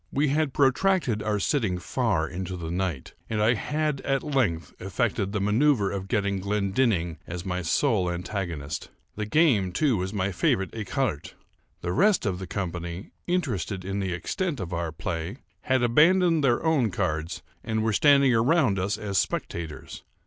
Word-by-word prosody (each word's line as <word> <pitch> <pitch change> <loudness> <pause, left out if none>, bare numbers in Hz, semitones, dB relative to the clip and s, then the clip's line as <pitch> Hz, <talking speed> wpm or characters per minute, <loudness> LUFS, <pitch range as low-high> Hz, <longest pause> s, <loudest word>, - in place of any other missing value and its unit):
We 145 +1 +1
had 150 0 +1
protracted 135 - +2
our 105 -1 0
sitting 105 -4 0
far 90 -2 0
into 90 +1 -5
the 80 -1 -5
night, 90 -6 -3 0.2
and 110 - -1
I 110 +3 +4
had 150 +5 -1
at 135 -1 0
length 125 - 0
effected 100 +1 -1
the 105 - -1
manoeuvre 105 0 +2
of 95 -1 -5
getting 100 -3 0
Glendinning 100 - 0
as 85 +1 -6
my 90 -1 -2
sole 95 - +1
antagonist. 85 -4 -4 0.3
The 105 0 -3
game, 110 - +3
too, 125 - +2
was 95 +1 -2
my 100 -2 -1
favorite 95 +1 +1
écarté! 110 - -2 0.5
The 90 0 -2
rest 200 - +3
of 95 -3 -1
the 95 - -6
company, 85 -1 -5 0.2
interested 110 - -1
in 100 +1 -2
the 95 -2 -2
extent 145 - -2
of 90 -2 -5
our 85 -1 -2
play, 85 +2 -4 0.3
had 130 -2 +2
abandoned 165 +6 +4
their 125 +3 +2
own 145 -8 +3
cards, 85 -3 -2 0.2
and 110 -1 -1
were 110 -1 +1
standing 140 +2 +5
around 120 - +3
us 100 +2 -1
as 100 -3 0
spectators. 80 -3 -4
100 Hz, 165 wpm, -26 LUFS, 90-130 Hz, 0.5 s, standing